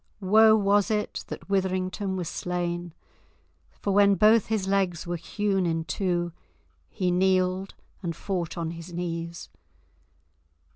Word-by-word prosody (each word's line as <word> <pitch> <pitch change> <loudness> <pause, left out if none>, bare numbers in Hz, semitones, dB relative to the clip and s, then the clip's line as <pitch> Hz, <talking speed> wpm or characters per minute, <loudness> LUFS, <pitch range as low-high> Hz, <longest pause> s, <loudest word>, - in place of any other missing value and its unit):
Woe 215 +3 +6
was 205 -1 +3
it 210 -1 -2
that - - -8
Witherington 190 0 -1
was 180 -3 -3
slain, 175 -1 -3 0.7
for 200 - -3
when 200 0 +5
both 215 +1 +5
his 215 -4 -1
legs 190 -4 0
were 175 0 -2
hewn 195 +2 -1
in 165 -1 -1
two 175 -2 -1 0.6
he 180 -2 -1
kneeled 185 +1 +1 0.3
and 170 -4 -3
fought 175 -2 -3
on 165 -1 -2
his 170 +1 -9
knees. 170 -1 -5
185 Hz, 130 wpm, -26 LUFS, 175-200 Hz, 0.7 s, Woe